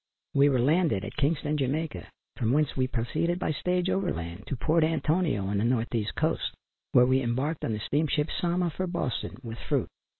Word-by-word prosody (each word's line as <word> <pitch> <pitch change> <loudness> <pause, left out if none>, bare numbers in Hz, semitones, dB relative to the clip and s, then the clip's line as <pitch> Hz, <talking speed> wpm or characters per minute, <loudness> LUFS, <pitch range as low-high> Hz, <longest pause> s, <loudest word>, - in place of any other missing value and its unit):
We 140 +1 +5
were 135 - +2
landed 135 - +2
at - - -7
Kingston, 150 0 0
Jamaica, 150 +4 -2 0.3
from 120 -2 0
whence 150 0 +2
we 130 -1 +1
proceeded 150 +9 -1
by 180 - -1
stage 180 +3 0
over 190 -1 +1
land 85 +4 -6
to 140 - -2
Port 160 +5 +2
Antonio 155 - +1
on 100 +1 0
the - - +1
north 120 0 0
east 110 -3 -1
coast, - - 0 0.4
where 125 - +6
we 130 +1 +3
embarked 130 +6 -1
on 110 - 0
the 105 - -2
steamship 150 +3 0
Sama, 175 0 0
for 185 +4 -3
Boston, 135 - -3
with 115 -1 -7
fruit. - - -1
145 Hz, 195 wpm, -28 LUFS, 120-165 Hz, 0.4 s, where